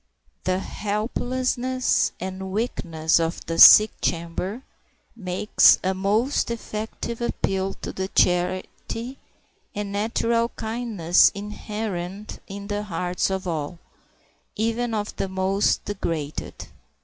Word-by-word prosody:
The 185 0 +1
helplessness 250 +5 -1
and 190 +1 -5
weakness 170 -7 0
of 165 +1 -2
the 165 0 -3
sick 215 0 +10
chamber 175 +8 -2 0.5
makes 190 -1 +4
a 190 - +1
most 210 +10 +1
effective 230 +1 -5
appeal 195 -4 -1
to - - -4
the 190 0 -3
charity 185 +8 -1 0.6
and 205 -1 -4
natural 230 +3 0
kindness 220 -7 +2
inherent 210 -1 -5
in 200 0 -7
the 205 0 -2
hearts 180 -2 -2
of 190 -1 -3
all, 160 0 -3 0.8
even 230 +1 -1
of 210 0 -3
the - - -1
most 190 +2 +1
degraded. 165 -7 -4
200 Hz, 105 wpm, -24 LUFS, 185-225 Hz, 0.8 s, sick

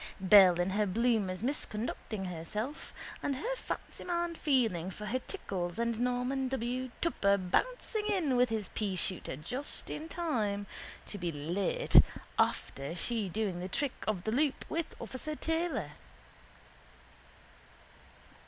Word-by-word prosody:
Belle 185 -2 +8
in 175 +2 +1
her 210 +1 +2
bloomers 210 -2 +1
misconducting 220 -5 -3
herself, 210 - -4 0.3
and 280 - 0
her 480 - -2
fancyman 345 -7 -3
feeling 230 - +1
for 210 +3 -7
her 240 +5 0
tickles 185 - -3
and 235 -1 0
Norman 250 +2 0
W. 255 0 -2
Tupper 200 -12 +3
bouncing 425 - 0
in 355 -11 +2
with 245 0 +4
his 220 -3 -2
peashooter 190 -7 -2
just 250 - -4
in 315 +2 -5
time 215 - -1 0.4
to 205 - -6
be 175 -1 -1
late 165 +6 +4 0.4
after 140 +4 0
she 215 +2 -1
doing 195 -2 -1
the 180 +1 -4
trick 275 +7 0
of 200 -5 0
the 220 - -1
loop 280 +3 +1
with 330 0 -3
officer 305 +4 -4
Taylor. 325 +2 -1
225 Hz, 125 wpm, -32 LUFS, 190-275 Hz, 0.4 s, Belle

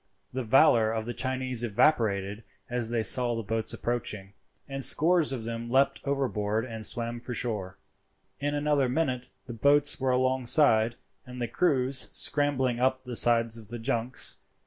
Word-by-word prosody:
The 130 - -3
valour 115 -2 +4
of 110 -1 -3
the 120 - -5
Chinese 130 -1 -1
evaporated 105 -4 0 0.3
as 120 -2 -2
they 115 -1 -1
saw 120 +1 +1
the 115 - -4
boats 110 +2 -2
approaching, 105 -5 -4 0.3
and 135 -1 -3
scores 160 +4 +4
of 125 -4 -5
them 115 +1 -6
leapt 135 +3 +1
overboard 115 -6 -2
and 115 -3 -8
swam 115 +1 0
for 125 +1 -7
shore. 105 -6 -3 0.6
In 145 +1 -2
another 145 -3 0
minute 130 -3 -2 0.2
the 120 - -8
boats 145 +5 +3
were 130 0 -1
alongside 125 -2 +2 0.3
and 125 0 -9
the 120 - -2
crews 130 -4 +1
scrambling 135 -4 0
up 130 +1 0
the 125 -2 -7
sides 115 -1 +3
of 110 -2 -13
the 120 +3 -7
junks. 115 +1 +1
120 Hz, 160 wpm, -27 LUFS, 115-135 Hz, 0.6 s, valour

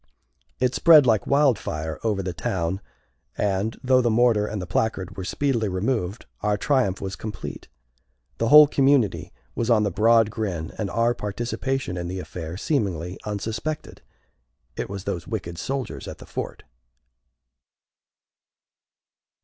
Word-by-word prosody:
It 125 0 +1
spread 160 -5 +7
like 110 -5 +2
wildfire 100 - +1
over 105 -4 0
the 90 -1 -3
town, 85 +4 -2 0.6
and, 100 +2 -1
though 130 0 +4
the 120 - +2
mortar 110 -2 +3
and 105 0 -4
the 90 - -4
placard 95 0 -1
were 95 - -5
speedily 115 0 0
removed, 100 +1 -2 0.2
our 105 -1 +1
triumph 125 -6 +1
was 95 -1 -4
complete. 105 -5 -7 0.7
The 115 - +1
whole 150 +4 +10
community 135 -5 +2 0.2
was 115 0 -2
on 110 -3 +4
the 100 - 0
broad 115 +2 +4
grin, 95 -7 -3
and 105 -3 -1
our 115 +5 +2
participation 120 0 -3
in 85 0 -3
the 95 +1 -4
affair 85 -1 -6
seemingly 95 - -2
unsuspected. 110 +8 -4 0.7
It - - -4
was 100 -1 -6
those 85 -4 -4
wicked 85 0 -5
soldiers 135 -1 -4
at - - -7
the - - -12
fort! - - -6
105 Hz, 140 wpm, -24 LUFS, 95-120 Hz, 0.7 s, whole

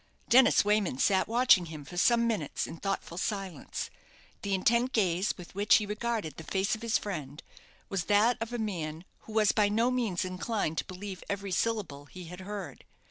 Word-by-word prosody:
Dennis 245 -3 +6
Wayman 205 -9 +1
sat 190 +7 +3
watching 230 -7 +4
him 155 -3 -8
for 175 - -10
some 235 +6 +4
minutes 210 -11 -1
in - - -8
thoughtful 195 -2 -3
silence. 195 -6 -4 0.5
The 200 -1 0
intent 235 +6 +2
gaze 185 -2 +1
with 180 -2 -11
which 200 +2 +4
he 210 - +3
regarded 210 -4 -3
the 160 - -7
face 190 +4 0
of 220 - -3
his 230 -1 +2
friend, 150 -8 -6 0.4
was 195 -3 -2
that 215 +4 +4
of 225 +1 -3
a 240 - -2
man 170 -7 -4 0.2
who - - -7
was 215 -2 +4
by 210 -2 +3
no 230 +4 +2
means 225 -9 0
inclined 185 -3 -2
to - - -3
believe 190 0 -7
every 200 -1 -3
syllable 185 -9 -1
he 180 +5 -10
had 180 +2 -9
heard. 200 +1 -7
200 Hz, 190 wpm, -30 LUFS, 180-220 Hz, 0.5 s, Dennis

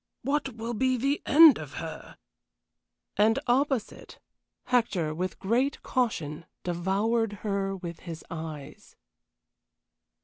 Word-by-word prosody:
What 275 -3 -1
will 230 +1 -4
be 255 +2 +1
the 275 +4 0
end 310 0 +8
of - - -8
her?" - - -8 1.0
And 220 +2 +4
opposite, 260 -2 -1 0.5
Hector, 205 -11 +1
with 180 +1 -3
great 245 +8 0
caution, 165 - -2 0.2
devoured 200 +6 0
her 195 -1 -1
with 170 -3 -7
his 165 -2 -8
eyes. 160 -4 -8
215 Hz, 105 wpm, -28 LUFS, 175-255 Hz, 1.0 s, end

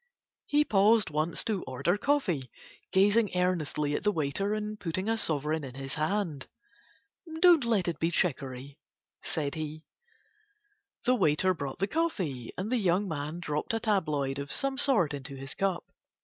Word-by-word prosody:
He 295 +1 +3
paused 210 - +4
once 155 +3 0
to 210 -5 -1
order 130 +8 0
coffee, 205 - 0 0.4
gazing 200 0 +3
earnestly 155 -5 0
at - - -1
the 210 - +2
waiter 195 +5 -1
and 215 0 -4
putting 185 +2 -3
a 225 - +2
sovereign 155 -5 0
in 130 -2 -8
his 135 0 -5
hand. 155 -2 -1 0.9
"Don't 345 -5 +6
let 220 -6 +1
it 170 - -2
be 165 - +1
chicory," 140 -4 -2 0.4
said 145 -3 -2
he. 155 0 -5 1.2
The 250 - +4
waiter 185 -4 +3
brought 140 -5 -5
the 195 - +1
coffee, 190 - -2
and 200 +5 -3
the 255 - +3
young 195 -1 +1
man 155 +1 -4
dropped 150 +7 -2
a - - 0
tabloid 150 -11 0
of 140 0 -5
some 275 0 0
sort 225 - +3
into 140 -1 -7
his 135 0 -5
cup. 190 -3 -1
175 Hz, 160 wpm, -29 LUFS, 145-210 Hz, 1.2 s, Don't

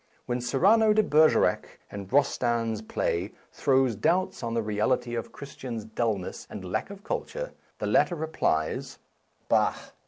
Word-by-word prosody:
When 120 0 -2
Cyrano 210 - +4
de 215 0 +4
Bergerac, 155 -3 +3
in 100 -2 -7
Rostand's 120 -4 +1
play, 90 -5 -2 0.2
throws 130 -4 +2
doubts 175 - 0
on 115 -1 -3
the 115 - 0
reality 110 +3 0
of 115 -1 -4
Chris 140 0 -10
tian's 115 -5 -6
dullness 110 -4 -3
and 95 - -7
lack - - -1
of 200 0 -10
culture, - - -4 0.2
the - - -3
lat - - +4
ter 175 - -4
replies: 150 - -1 0.3
" - - -42
Bah - - +3
125 Hz, 155 wpm, -27 LUFS, 110-160 Hz, 0.3 s, Cyrano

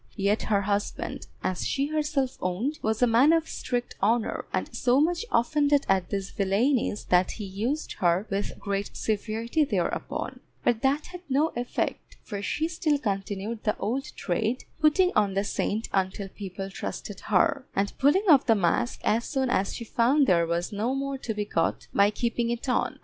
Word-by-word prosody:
Yet 200 +1 +1
her 200 -2 +3
husband 205 +1 -2 0.2
(as 185 -1 -1
she 275 0 0
herself 295 -4 0
owned) 230 - -1
was 220 +2 0
a - - +8
man 245 +6 +5
of 325 -1 +2
strict 245 -1 -3
honour, 225 +3 +1
and - - -2
so 250 +2 +3
much 340 +5 +2
offended 285 +3 +3
at 190 -2 +2
these 195 -1 -3
villainies 210 +3 +1
that 180 0 +3
he 215 - -7
used 225 +11 -2
her 175 +2 +2
with 200 +1 -2
great 200 0 -3
severity 225 +6 0
thereupon, 290 - -2 0.2
but 230 -2 +2
that 280 +3 +1
had 360 0 -9
no 290 +4 +3
effect, 240 +1 -3
for 205 -3 -5
she 310 +9 -1
still 320 -3 +1
continued 205 -1 -3
the 210 - 0
old 265 +6 -2
trade, 220 +7 -1 0.2
putting 325 +4 +4
on 200 -2 +2
the 195 - +2
saint 210 +2 -1
until 195 +1 -1
people 195 0 -7
trusted 195 +1 -6
her, 235 +7 +2
and 200 +1 0
pulling 295 +10 +4
off 290 -6 +6
the 225 - +6
mask 200 +6 0
as 230 +2 +2
soon 265 -3 -1
as 195 - 0
she - - -5
found 255 +6 +3
there 170 -6 +3
was 170 +1 -1
no 225 +6 0
more 275 0 -3
to 225 -4 -4
be 210 0 -2
got 165 -5 -1
by 200 0 +5
keeping 235 +2 -1
it 240 +2 -3
on. 250 - 0
225 Hz, 180 wpm, -27 LUFS, 200-275 Hz, 0.2 s, a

